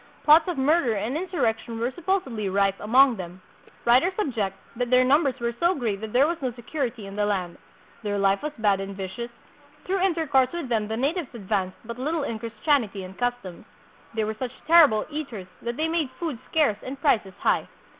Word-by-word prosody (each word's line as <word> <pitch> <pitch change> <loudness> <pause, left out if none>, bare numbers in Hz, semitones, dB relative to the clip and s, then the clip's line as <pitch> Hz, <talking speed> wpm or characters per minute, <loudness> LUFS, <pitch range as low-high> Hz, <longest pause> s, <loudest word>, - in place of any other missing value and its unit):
Plots 315 +2 +6
of 355 -4 -2
murder 270 -3 +2
and 220 +6 -2
in 360 +4 -2
surrection 230 -8 -1
were 240 +3 0
supposedly 275 - -1
rife 195 0 +2
among 250 +3 +5
them. 180 0 -7 0.5
Writers 260 +11 +4
ob 310 - -1
ject 200 -4 -2 0.2
that 245 0 -2
their 255 0 +5
numbers 275 -1 +3
were 235 0 -1
so 345 +2 +3
great 220 - -2
that 220 -1 -5
there 255 +5 +5
was 330 +1 -2
no 255 -2 -1
security 240 -2 -4
in 195 0 -8
the 205 0 +1
land; 185 -4 -2 0.4
their 205 -2 -2
life 195 0 +2
was 300 - -3
bad 205 -3 +2
and 195 0 -5
vicious; 195 +5 -5 0.6
through 385 +1 0
intercourse 315 -8 +2
with 340 -7 -4
them 220 -3 0
the 220 +1 -3
natives 290 +3 -1
advanced 195 -3 -2
but 235 +2 -7
little 305 +3 -1
in 230 -5 -3
Christianity 225 -2 0
and 185 +1 -9
customs; 245 -7 -3 0.5
they 220 - +1
were 215 +1 -2
such 245 +3 -5
terrible 310 -10 +6
eaters 275 -11 -5 0.2
that 235 0 -4
they 315 - +1
made 320 -4 0
foods 315 -9 -3
scarce 295 -10 +2
and 270 +1 -7
prices 210 - +1
high. - - +1
245 Hz, 200 wpm, -25 LUFS, 210-300 Hz, 0.6 s, Plots